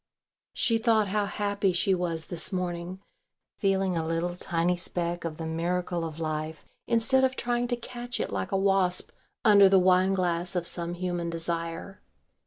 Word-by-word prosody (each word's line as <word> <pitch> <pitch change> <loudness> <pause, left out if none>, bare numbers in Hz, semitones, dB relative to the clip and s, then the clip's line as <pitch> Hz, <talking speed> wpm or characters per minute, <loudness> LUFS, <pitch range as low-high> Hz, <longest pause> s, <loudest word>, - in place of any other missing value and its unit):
She 230 -1 +2
thought 225 -3 +2
how 205 0 0
happy 200 -1 0
she 180 +2 +2
was 170 -3 -1
this 175 -3 -2
morning, 180 0 -4 0.6
feeling 195 -2 +1
a 165 - 0
little 165 +2 -2
tiny 175 0 0
speck 175 0 -2
of 155 -2 -4
the 165 - -5
miracle 170 +1 -2
of 160 -1 -6
life 155 0 -4 0.2
instead 235 +3 +3
of 260 0 +2
trying 240 0 -1
to 245 - 0
catch 240 +1 -6
it - - -2
like 190 - -3
a 195 - +2
wasp 195 -2 +2 0.3
under 200 -2 +7
the 190 - +5
wine 185 +1 +4
glass 175 -1 -1
of 175 -1 -1
some 170 0 -1
human 175 -1 -3
desire. 165 +2 -4
180 Hz, 170 wpm, -27 LUFS, 170-200 Hz, 0.6 s, under